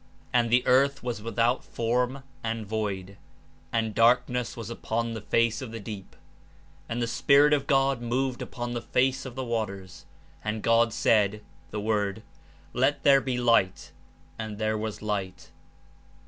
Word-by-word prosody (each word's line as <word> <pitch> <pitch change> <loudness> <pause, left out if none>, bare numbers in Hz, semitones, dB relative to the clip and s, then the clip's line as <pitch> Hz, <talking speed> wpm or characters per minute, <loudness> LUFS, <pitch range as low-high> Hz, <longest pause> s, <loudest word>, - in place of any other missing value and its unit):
And 120 -1 +3
the 125 +2 +3
earth 140 +2 +3
was 120 -4 -3
without 115 +2 0
form 125 +3 -1 0.2
and 115 -1 -3
void; 100 -2 -3 0.5
and 110 -2 0
dark 115 +3 +4
ness 125 -1 -3
was 115 0 -6
upon 115 0 -2
the 110 - -5
face 115 +4 +1
of 125 -4 -6
the 115 - -6
deep. 100 -2 -8 0.7
Be 115 - -2
Lightr - - -3
"^"^ - - -1
^^^^ - - 0
Spirit 140 +5 +4
of 140 -2 +1
God 135 -2 +2
moved 125 +2 -1
upon 120 -1 -5
the 120 - -3
face 130 +2 0
of 125 - -9
the 130 - -3
zvaters. 100 -5 -4 0.4
And 105 0 -3
God 115 0 +4
said 105 -1 +2 0.3
(The 105 +3 -4
Word), 105 -1 -1 0.5
Let 130 +4 +1
there 140 -1 +6
be 130 -2 -2
light; 95 -10 +2 0.5
and 110 -2 -5
there 110 0 0
was 110 -1 -4
light.'' 100 -3 -4
115 Hz, 165 wpm, -27 LUFS, 110-125 Hz, 0.7 s, there